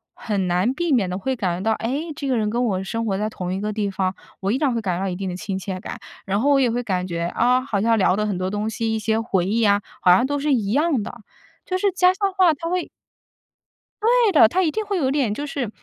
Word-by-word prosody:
很 200 -5 -2
难 180 +8 +1
避 345 +3 -1
免 235 -8 +3
地 180 - -3
会 265 +6 -1
感 185 -5 -2
觉 220 - +1
到， - - +3
诶， 285 +8 -3
这 285 -2 -4
个 260 - +1
人 215 -2 0
跟 240 +3 0
我 190 -4 -1
生 230 +4 -3
活 200 -3 0
在 210 +2 -1
同 180 -4 -4
一 190 - -3
个 210 +1 -2
地 210 -1 -1
方， 190 -1 -1 0.3
我 195 +1 0
依 245 - +1
然 275 -3 +1
会 230 - -1
感 185 -5 -1
觉 - - -2
到 - - -1
一 180 - -3
定 190 +1 -4
的 180 - -4
亲 190 0 -4
切 190 -1 -5
感。 195 - -7 0.3
然 200 +2 0
后 280 - +2
我 280 -1 +5
也 255 -3 +3
会 240 +2 -1
感 185 -5 -1
觉， 170 -2 -3
啊， 250 +2 +3
好 230 -6 -2
像 225 +3 +3
聊 190 -2 +3
的 210 - 0
很 205 -3 -2
多 185 +1 -2
东 210 +2 -2
西， 225 0 -2
一 220 - -1
些 220 +1 0
回 195 -6 0
忆 220 +5 0
呀， 205 -2 +3 0.2
好 180 - +5
像 185 +8 +5
都 285 +1 -1
是 290 +1 0
一 210 -6 0
样 290 -2 +2
的， 240 - -9 0.4
就 370 - -1
是 400 +2 +2
家 365 0 +4
乡 390 0 -1
话， 370 -3 +4
它 330 +3 -5
会 360 0 -2 1.1
对 470 0 +4
的， 295 - +7
它 370 +11 +1
一 320 - +1
定 435 - -2
会 400 -1 -1
有 265 -6 +1
点 270 -7 +1
就 290 +7 -4
是 275 -5 -3
225 Hz, 305 characters per minute, -22 LUFS, 195-285 Hz, 1.1 s, 的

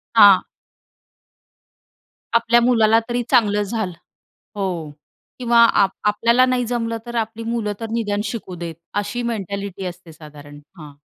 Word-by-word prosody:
हां. 200 -4 +8 1.9
आपल्या 235 +1 +4
मुलाला 225 -2 +4
तरी 240 0 -1
चांगलं 210 -5 +3
झालं 205 -3 -3 0.6
हो 175 -6 -3 0.5
किंवा 240 -1 +2
आ 200 -3 +4 0.2
आपल्याला 235 +4 +3
नाही 250 -1 0
जमलं 230 -1 -2
तर 240 - -7
आपली 225 0 -3
मुलं 225 -3 -2
तर 225 -1 -5
निदान 205 -3 -1
शिकू 205 -4 -5
देत. 170 -1 -6 0.2
अशी 225 +4 -2
मेंटॅलिटी 200 -2 -5
असते 175 -2 -9
साधारण. 145 -2 -13 0.2
हां. 150 -2 -11
215 Hz, 130 wpm, -20 LUFS, 190-235 Hz, 1.9 s, हां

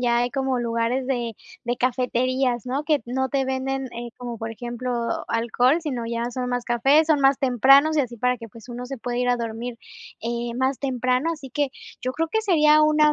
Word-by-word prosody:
ya 240 -1 +2
hay 245 +1 +1
como 265 -2 -1
lugares 235 +3 -1
de 240 -4 -1 0.3
de 240 +1 -1
cafeterías, 255 0 0
¿no? 275 +4 -2
Que 295 -4 +2
no 265 +2 -1
te 270 0 0
venden, 265 0 -2
eh, 240 -1 -7
como 240 -2 -6
por 225 +1 -4
ejemplo, 240 +1 -3
alcohol, 245 +6 +2
sino 265 -8 -3
ya 235 +1 -2
son 250 0 -3
más 245 -1 -2
cafés, 275 +7 +3
son 305 -2 +4
más 270 0 +5
tempranos 275 +4 +5
y - - +5
así 240 -2 -6
para 250 +2 +1
que, 230 - -8
pues, 230 +3 -14
uno 245 +1 -6
se 270 +1 -5
pueda 245 +1 -4
ir 250 - +1
a 245 - +3
dormir, 235 +1 -5 0.5
eh, 235 0 -3
más 260 +1 0
temprano, 255 +2 0
así 285 -5 -9
que 285 0 0 0.3
yo 255 +1 -2
creo 325 +3 -1
que 440 +6 0
sería 305 -6 +5
una 305 0 +4
250 Hz, 210 wpm, -24 LUFS, 240-270 Hz, 0.5 s, más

